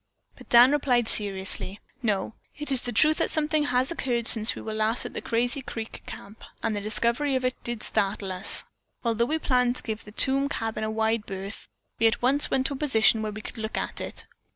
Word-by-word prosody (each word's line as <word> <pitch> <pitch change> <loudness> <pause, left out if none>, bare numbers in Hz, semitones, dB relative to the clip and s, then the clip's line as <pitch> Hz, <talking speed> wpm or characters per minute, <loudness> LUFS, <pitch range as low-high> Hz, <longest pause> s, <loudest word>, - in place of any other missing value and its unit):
But - - -15
Dan 245 +2 +8
replied 250 -5 +2
seriously, 195 -1 -2 0.2
"No, 210 -3 -1 0.2
it 295 -1 -5
is 260 -2 +4
the 245 - -4
truth 310 +7 +4
that - - 0
something 305 -1 +1
has 250 +1 +1
occurred 245 -8 -1
since 220 -2 +5
we - - -7
were 220 - -5
last 220 +3 +1
at 245 - -6
the - - -4
Crazy 240 +3 -1
Creek 225 -3 -7
Camp, 205 +3 -10 0.2
and 225 -2 0
the 205 - -3
discovery 235 +6 0
of 255 -1 -1
it 255 - +1
did 235 -2 -4
startle 200 -2 0
us. 185 +1 +3 0.4
Although 235 -1 +1
we 310 +6 0
planned 250 -5 +1
to - - -5
give 220 -1 -4
the 210 - -12
tomb 275 +5 +1
cabin 225 -4 -3
a 215 - -1
wide 220 0 0
berth, 195 +2 -7 0.3
we 225 - +6
at 225 - +1
once 270 +4 +2
went 260 0 +1
to 280 - +1
a - - -5
position 225 -6 +3
where 215 -1 -3
we 215 +1 -8
could 230 - -9
look 220 0 -4
at - - -3
it. - - -5
230 Hz, 225 wpm, -26 LUFS, 215-260 Hz, 0.4 s, Dan